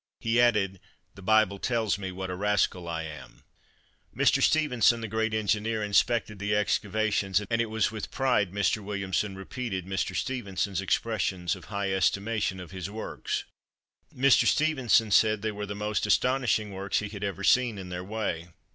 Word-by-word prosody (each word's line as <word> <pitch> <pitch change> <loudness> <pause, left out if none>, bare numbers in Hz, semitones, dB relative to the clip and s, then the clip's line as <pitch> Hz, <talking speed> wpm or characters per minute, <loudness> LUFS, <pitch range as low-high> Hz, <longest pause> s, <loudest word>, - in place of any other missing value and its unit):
He 115 +1 +2
added, 105 -6 +2 0.3
"The 100 - -13
Bible 110 0 +3
tells 115 -4 0
me 95 -1 -4
what 95 0 -5
a - - -3
rascal 95 -3 0
I 80 -1 -3
am." 75 -1 -10 0.7
Mr. - - +3
Stephenson, 125 -7 +3
the 115 - -4
great 110 +1 -1
engineer, 110 +1 0
inspected 105 0 +1
the 105 +1 0
excavations, 105 -1 +1
and 115 +3 -1
it 115 - -2
was 110 -2 0
with 110 -2 -5
pride 125 -8 +1
Mr. 100 +2 0
Williamson 100 -1 -2
repeated 95 -1 -5
Mr. 95 -1 -2
Stephenson's 100 -6 -2
expressions 95 -4 -1
of - - -13
high 100 -2 -2
estimation 100 +1 0
of 90 - -9
his 95 -1 -5
works. 110 +2 -4 0.7
Mr. 135 +1 +4
Stephenson 130 -8 +3
said 110 0 +4
they 110 - 0
were 105 0 -5
the 100 - -5
most 105 0 -1
astonishing 110 -1 +2
works 95 0 -2
he 105 - -2
had 100 -1 -7
ever 100 0 -3
seen 120 -1 +3
in 95 -2 -7
their 90 0 -5
way. 95 -5 -3
105 Hz, 165 wpm, -28 LUFS, 95-110 Hz, 0.7 s, Mr